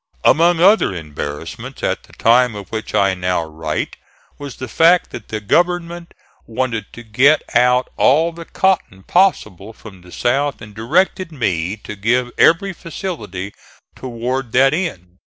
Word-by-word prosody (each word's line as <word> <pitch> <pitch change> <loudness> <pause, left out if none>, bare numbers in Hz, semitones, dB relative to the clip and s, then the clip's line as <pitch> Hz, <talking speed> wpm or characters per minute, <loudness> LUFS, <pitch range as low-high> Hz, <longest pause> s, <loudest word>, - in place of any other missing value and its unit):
Among 170 +1 +4
other 190 - +4
embarrassments, 75 -3 -7
at - - -1
the - - -22
time 120 0 +3
of 100 -3 -9
which 110 -1 -5
I 100 -1 +3
now 90 -2 -1
write, 80 -1 -4 0.4
was 140 -3 -7
the 130 - -7
fact 165 +8 +3
that - - -9
the 110 - -4
government 170 - -1 0.3
wanted 115 -3 -3
to 120 - -10
get 130 +7 +3
out 125 +1 +3
all 160 +6 +3
the 170 0 -10
cotton 180 - -1
possible 110 - 0
from 100 -5 -14
the 90 0 -16
South 140 +6 0
and 105 -2 -12
directed 165 - 0
me 95 - -2
to 105 - -7
give 120 +5 0
every 190 +4 +4
facility 105 - -6 0.4
toward 125 0 -4
that 135 +2 +4
end. 95 - -4
120 Hz, 150 wpm, -18 LUFS, 100-165 Hz, 0.4 s, Among